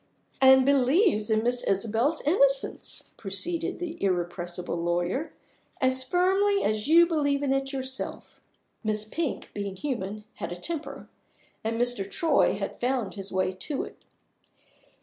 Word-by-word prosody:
"And 265 0 +7
believes 275 - +3
in 220 0 +2
Miss 245 +1 +1
Isabel's 225 +10 +1
innocence," - - +1
proceeded 335 - -1
the 345 - -6
irrepressible 175 -1 -2
lawyer, 175 - -1 0.5
"as 260 0 +2
firmly 380 +7 +2
as 215 +2 0
you 335 +2 +7
believe 290 -4 0
in 270 -1 +2
it 270 0 -1
yourself." 265 -1 -5 0.4
Miss 215 -1 0
Pink 310 +6 -3
(being 200 -2 -4
human) 210 -3 -4
had - - -4
a - - -3
temper; 320 - -5 0.6
and 225 +1 -2
Mr. 245 -5 -1
Troy 315 +5 +2
had 195 0 -5
found 250 -4 0
his 195 -1 -7
way 185 0 0
to 265 +10 -2
it. - - -11
255 Hz, 135 wpm, -27 LUFS, 200-310 Hz, 0.6 s, And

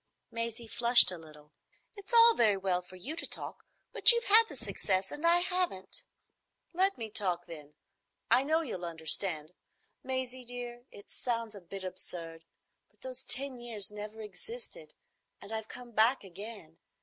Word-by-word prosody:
Maisie 230 0 -5
flushed 235 -4 +4
a 180 - -7
little. 150 -2 -17 0.4
"It's 405 +1 -10
all 465 0 +8
very 215 - +2
well 185 -2 -1
for 180 +1 -15
you 260 - -5
to 335 - -3
talk, - - -3 0.3
but - - +10
you've 470 0 +1
had 450 0 +8
the 295 - -9
success 200 -4 -1
and 310 +3 0
I 345 +1 +5
haven't." 360 - -1 0.7
"Let 380 +3 +2
me 220 -2 -7
talk, 180 -5 0
then. 150 -2 -12 0.6
I - - +6
know 315 +3 +1
you'll 230 - -6
understand. 160 0 +1 0.5
Maisie, 260 -1 -4
dear, 245 0 -8
it 200 - -16
sounds 230 -3 -3
a 200 - -11
bit 190 +2 -9
absurd, 165 -3 -8 0.4
but - - -35
those 260 0 -6
ten 265 -1 -2
years 220 -5 -3
never 210 +1 -9
existed, 455 - -9 0.4
and 200 - -10
I've 220 -1 -5
come 245 -1 -10
back 225 +4 +3
again. 195 -3 -11
225 Hz, 160 wpm, -30 LUFS, 185-260 Hz, 0.7 s, but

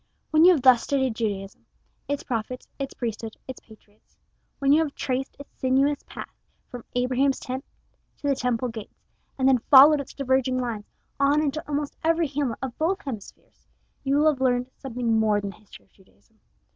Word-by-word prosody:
When 310 +1 +5
you 365 - +8
have 290 -7 -1
thus 255 -3 +7
studied 265 -3 0
Judaism, 200 -3 -4 0.4
its 285 0 -2
prophets, 245 +1 -4
its 275 -1 -5
priesthood, 225 -2 -5
its 260 - -7
patriots 215 -1 -21 0.4
when 275 0 +3
you 315 - +5
have 300 -3 -3
traced 265 0 -3
its 285 - -13
sinuous 270 +2 +2
path - - -8 0.4
from 245 -2 -8
Abraham's 255 +2 +1
tent 260 +2 -5 0.5
to 285 - -5
the 280 - +3
Temple 250 -1 -1
gates, 225 -2 -10 0.3
and 265 -1 +2
then 265 -2 +5
followed 285 +1 +8
its 280 - -11
diverging 260 -1 +1
lines 235 -4 -4 0.3
on 280 +2 +3
into 305 0 -1
almost 290 -1 -3
every 330 +1 +2
hamlet 280 -4 -2
of 255 -2 -4
both 360 +5 +1
hemispheres, 225 -8 -10 0.4
you 275 +1 +1
will 305 +1 +5
have 270 -3 -7
learned 250 0 +1
something 235 -4 -1
more 215 -1 +2
than 200 -1 -5
the 185 - -17
history 215 - -17
of - - -37
Judaism. 215 +3 -28
260 Hz, 185 wpm, -25 LUFS, 230-280 Hz, 0.5 s, you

